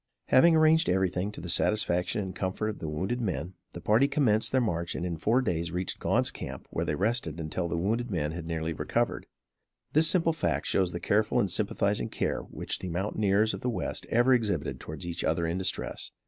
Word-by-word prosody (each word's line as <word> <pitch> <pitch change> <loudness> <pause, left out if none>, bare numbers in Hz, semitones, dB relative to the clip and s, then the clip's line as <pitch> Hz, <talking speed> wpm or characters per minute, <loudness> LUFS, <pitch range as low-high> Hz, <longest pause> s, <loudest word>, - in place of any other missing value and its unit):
Having 165 +5 +6
arranged 160 - +4
everything 95 +1 0
to 105 - -9
the 85 - -6
satisfaction 90 +2 +1
and 95 -1 -6
comfort 95 +4 -2
of 105 - -6
the 80 - -4
wounded 95 +11 -2
men, 95 -4 -3 0.2
the 85 - -8
party 110 +9 +4
commenced 120 -7 +2
their 130 - +3
march 85 -8 -1
and 90 - -3
in 85 -2 -2
four 115 +11 +2
days 85 -6 -1
reached 90 +2 -2
Gaunt's - - +2
camp - - -7
where - - -1
they 75 - -1
rested 95 - 0
until 80 +2 -3
the 85 - -2
wounded 115 +8 -1
men 80 -6 -1
had 85 0 -6
nearly 80 0 -2
recovered. - - -1 0.7
This 155 +2 +5
simple 165 -3 +2
fact 160 - -1
shows 95 -2 +1
the 85 - -4
careful 105 +5 +2
and - - +1
sympathizing - - 0
care - - -1
which - - -3
the 90 - -5
mountaineers 100 +4 +1
of - - -6
the 125 - -1
west 120 - -3
ever 120 +3 +4
exhibit 105 -10 0
towards 80 +3 -7
each 85 0 -4
other 85 +1 +1
in 85 +3 -1
distress. 95 - -2
95 Hz, 205 wpm, -28 LUFS, 85-115 Hz, 0.7 s, Having